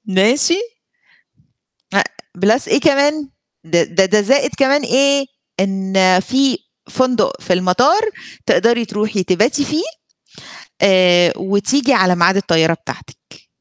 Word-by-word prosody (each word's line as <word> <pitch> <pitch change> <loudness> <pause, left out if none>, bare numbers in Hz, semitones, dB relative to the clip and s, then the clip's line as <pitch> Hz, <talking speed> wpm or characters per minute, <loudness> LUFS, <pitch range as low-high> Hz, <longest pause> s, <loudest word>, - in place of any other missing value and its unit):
ماشي؟ 265 - +2 1.4
أ - - +4 0.4
plus 220 +7 +1
إيه - - +1
كمان 290 -1 +1 0.4
د 165 +1 -2 0.2
ده 195 - +4
ده 210 +3 +2
زائد 270 +7 +1
كمان 275 +1 +2
إيه، 275 +3 +1 0.3
إن 190 -1 +1
في 265 - 0 0.3
فندق 255 -3 -1
في 185 - -2
المطار 185 - +2 0.5
تقدري 235 0 +1
تروحي 210 -1 -3
تباتي 220 +11 0
فيه 305 +4 -2 1.0
آآ 180 -3 +4
وتيجي 200 +9 0
على 185 -6 +2
ميعاد 175 +3 +2
الطيارة 165 -4 +1
بتاعتِك. - - -12
215 Hz, 115 wpm, -16 LUFS, 190-275 Hz, 1.4 s, أ